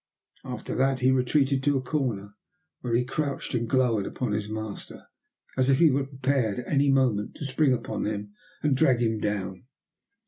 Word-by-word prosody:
After - - -5
that 135 0 +1
he 130 +1 +4
retreated 135 +1 +2
to 145 0 +2
a - - -1
corner, 120 -8 -2 0.5
where 120 -2 -1
he 125 +1 +2
crouched 140 +1 -3
and 120 -2 -1
glowered 120 -6 +2
upon 125 - -3
his 105 0 -2
master, 110 -1 -6 0.5
as 130 0 +2
if 135 - +5
he 160 -1 +6
were 135 +1 0
prepared 135 -5 0
at 125 - -5
any 140 -1 +2
moment 125 -6 +2
to 145 - -6
spring 140 +1 +2
upon 115 -4 -2
him 105 -1 -4 0.3
and 150 -3 +3
drag 130 -3 +4
him 115 -2 +1
down. 100 0 -3
130 Hz, 180 wpm, -27 LUFS, 110-135 Hz, 0.5 s, he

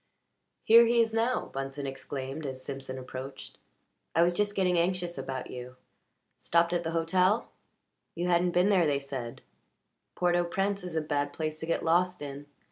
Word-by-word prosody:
"Here 230 +1 +8
he 235 0 +3
is 225 -1 +3
now!" 230 +3 0
Bunsen 135 +1 -4
exclaimed 135 +2 -5
as 130 -1 -6
Simpson 135 -1 -5
approached. 130 +1 -8 0.6
"I 170 - +6
was 175 +1 +3
just 205 +3 0
getting 185 -2 +2
anxious 175 0 0
about 130 -1 -5
you. 125 0 -8 0.6
Stopped 170 +1 +2
at 175 -1 0
the 165 - -2
hotel 180 +6 +2 0.6
you 175 +1 -1
hadn't 175 0 +3
been 180 +3 +3
there, 185 -5 +4
they 140 -1 +1
said. 130 -4 -6 0.7
Port 175 -1 +2
au 175 - +3
Prince 195 +2 -1
is 180 -2 -5
a 160 - +2
bad 145 -1 -1
place 155 -1 -3
to 160 - -5
get 165 - -1
lost 180 +2 +2
in. 140 0 -7
165 Hz, 175 wpm, -29 LUFS, 140-180 Hz, 0.7 s, Here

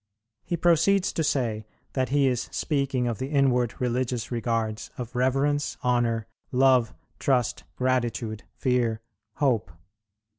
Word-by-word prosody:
He 175 - -2
proceeds 175 +3 +3
to 160 - 0
say 115 -7 -1 0.3
that 130 -2 0
he 140 +1 +3
is 125 -1 0
speaking 140 -4 0
of 115 -3 -2
the 130 - -2
inward 125 -5 +2
religious 125 -1 -1
regards 115 -2 -1
of 125 0 -6
reverence, 135 +3 +1
honour, 120 -3 +1 0.3
love, 130 -3 +4 0.2
trust, 125 -4 +1
gratitude, 120 -4 -1 0.2
fear, 120 -4 +1 0.3
hope. 120 - +1
125 Hz, 120 wpm, -26 LUFS, 115-135 Hz, 0.3 s, love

